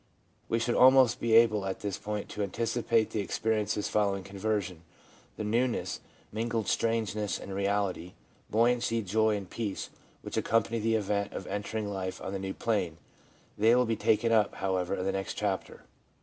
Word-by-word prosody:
We 115 - +2
should 120 +1 0
almost 130 -2 +6
be 115 -1 0
able 110 -3 +5
at 95 -1 -4
this 100 -2 -3
point 105 -1 -4
to 105 - -5
anticipate 115 +2 0
the 110 - -2
experiences 105 0 -1
following 100 -2 0
conversion, 100 -2 -3 0.6
the - - -3
newness, 115 +4 0 0.3
mingled 115 0 -2
strangeness 110 -3 0
and 100 - -7
reality, 100 -3 -1 0.4
buoyancy, 115 0 +2
joy 110 +2 +2
and 100 -2 -7
peace, 105 -2 -4 0.3
which - - -5
accompany 115 0 +1
the 115 +1 +1
event 100 -1 -1
of 95 - -5
entering 105 +1 -3
life 95 -1 -4
on 95 - -5
the 95 - -2
new 95 0 -4
plane. 95 -8 -1 0.6
They 115 +3 +5
will 125 0 +4
be 115 -1 0
taken 110 +1 +2
up, 110 -3 +3
however, 95 -1 -1
in 90 - -3
the 95 - +1
next 95 0 -3
chapter. 100 -3 -3
105 Hz, 165 wpm, -29 LUFS, 100-115 Hz, 0.6 s, almost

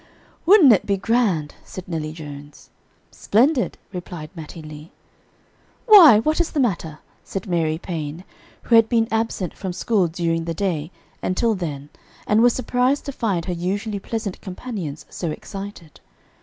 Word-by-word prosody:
"Would'nt 350 - +8
it 200 - 0
be 200 -1 +1
grand," 195 -9 0
said 185 - -9
Nellie 160 -3 -3
Jones. 145 -2 -11 0.4
"Splendid," 250 +4 +1 0.2
replied 175 -3 -7
Mattie 160 -1 -9
Lee. 155 +1 -11 0.9
"Why! 370 - +9
what 310 +9 +1
is 340 - -1
the 300 - -2
matter?" 170 - -1 0.3
said 195 - -5
Mary 165 -4 0
Paine, 165 -1 -5 0.4
who - - -2
had 225 -1 +6
been 230 -2 +2
absent 220 -6 -1
from 190 -3 -5
school 195 -1 +1
during 165 0 -2
the 165 -1 -3
day 165 -5 -2 0.3
until 225 +5 +1
then 150 -7 -5 0.4
and 215 +1 +3
was 240 0 +5
surprised 255 +2 0
to 280 - -4
find 200 -10 -2
her 180 - -2
usually 200 +4 -3
pleasant 215 -2 -5
companions 185 - -6
so 170 - -4
excited. 195 -1 -8
185 Hz, 150 wpm, -22 LUFS, 165-225 Hz, 0.9 s, Why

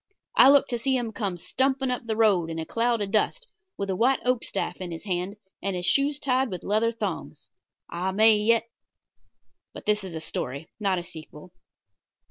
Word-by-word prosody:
I 260 - +8
looked 280 -1 +5
to 240 - -1
see 265 +2 +1
him 235 -3 -3
come 200 -6 -3
stumping 265 +7 0
up 245 -2 -4
the 220 - -1
road 200 -7 +3
in 165 - -4
a 160 - -3
cloud 230 +2 0
of 195 - -5
dust, 365 - +1 0.3
with 200 - -2
a - - -1
white 255 +7 +3
oak 250 -1 +1
staff - - -3
in 180 - -4
his 165 -1 -7
hand 185 0 -2 0.3
and 195 -1 -2
his 180 0 -3
shoes 280 +5 +2
tied 265 -2 +1
with 180 -3 -6
leather 220 +3 +1
thongs. 230 - -5 0.4
I 180 +2 -2
may 215 +3 +5
yet 220 +2 +3 1.1
But - - -9
this 210 -1 +1
is 185 -3 -7
a - - -3
story, 140 -1 -5
not 195 -3 +1
a 175 - -3
sequel. 160 0 -12
210 Hz, 200 wpm, -26 LUFS, 180-245 Hz, 1.1 s, I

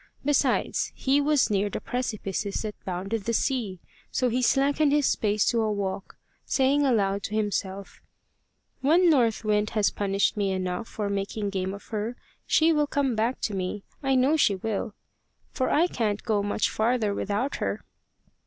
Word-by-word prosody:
Besides, 290 -1 +1
he 275 +2 +2
was 290 -5 +2
near 205 0 +1
the - - -4
precipices 215 -5 -3
that 215 -1 -4
bounded 195 +3 -3
the 230 - 0
sea, 225 -10 -1 0.3
so 255 - +1
he 250 +2 0
slackened 280 +3 +3
his 290 -1 +3
pace 210 -1 +1
to 235 -2 +1
a 215 -1 0
walk, 195 -2 -4 0.3
saying 275 +2 +2
aloud 200 -5 +1
to 215 - -4
himself: 200 -2 -3 0.8
"When 335 +6 +5
North 230 -6 +2
Wind 210 0 +1
has 210 - +3
punished 200 0 0
me 200 -2 0
enough 185 +4 -3
for 210 -2 -4
making 200 +1 -2
game 190 -1 -2
of 200 +1 -8
her, 220 +2 -3 0.3
she 325 +1 +4
will 300 -1 +2
come 275 -4 0
back 230 +4 -1
to 210 - -1
me; 190 +1 -3 0.2
I 270 -2 +1
know 265 +5 +3
she 205 -9 +3
will, 215 +2 -3 0.6
for 260 - -1
I 320 +4 +4
can't 215 - -2
go 210 -2 +1
much 205 +1 0
farther 220 -2 0
without 210 +7 -2
her." - - -3
215 Hz, 170 wpm, -26 LUFS, 200-260 Hz, 0.8 s, When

